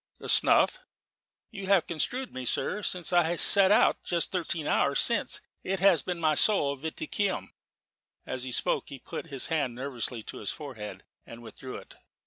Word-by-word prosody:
"The - - -7
snuff?" - - +5 0.7
"You 195 -3 -7
have 195 -4 +4
construed 245 - -3
me, 130 - -5
sir. 195 - -1
Since 180 -3 -3
I 175 -1 +3
set 195 +2 +6
out, 210 - +4
just 170 -2 -1
thirteen 170 -4 -2
hours - - +2
since, - - +2 0.2
it 190 0 -2
has 180 -4 +4
been 180 -2 -4
my 155 -2 +2
sole 145 -4 +2
viaticum." 160 +6 -3 0.7
As 130 - -4
he 130 0 -4
spoke - - +1
he 140 - -8
put 130 - -8
his 135 -4 -2
hand 140 -6 -1
nervously 125 -3 -4
to - - -8
his 105 - -4
forehead, 130 -9 -7 0.2
and 115 +1 -11
withdrew 130 +3 -9
it. - - -12
160 Hz, 170 wpm, -28 LUFS, 130-185 Hz, 0.7 s, set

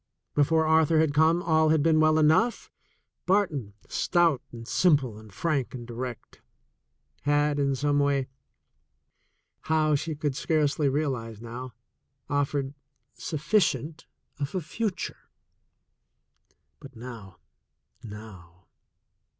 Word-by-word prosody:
Before 160 +2 +3
Arthur 160 0 +4
had 160 -2 +3
comr^ll 160 +1 +3
had 155 -2 +3
been 160 -1 +4
well 155 0 +4
enough. 160 +10 +2 0.6
Barton, 160 - +1
stout 170 -7 +2
and 115 -1 -10
simi..le 140 - +2
and 110 -1 -14
frank 140 - -1
and 120 -2 -7
direct, 120 0 -7 0.8
had 145 0 +1
in 140 -1 +1
some 145 +2 +1
way 140 -2 +1 0.7
— 70 +1 -48
how, 155 -1 +3
she 155 +2 -1
could 145 -2 -2
scarcely 150 -1 +1
realize 130 -7 -2
now 120 +1 -8 0.3
— 135 0 -48
offered 140 -1 -1 0.4
sufficient 160 -1 -1 0.3
of 140 +4 -3
a 185 - 0
future. 200 +5 -4 1.5
But 135 -2 -13
now, 115 -6 -10 0.7
now 95 -5 -12
145 Hz, 110 wpm, -27 LUFS, 125-160 Hz, 1.5 s, Arthur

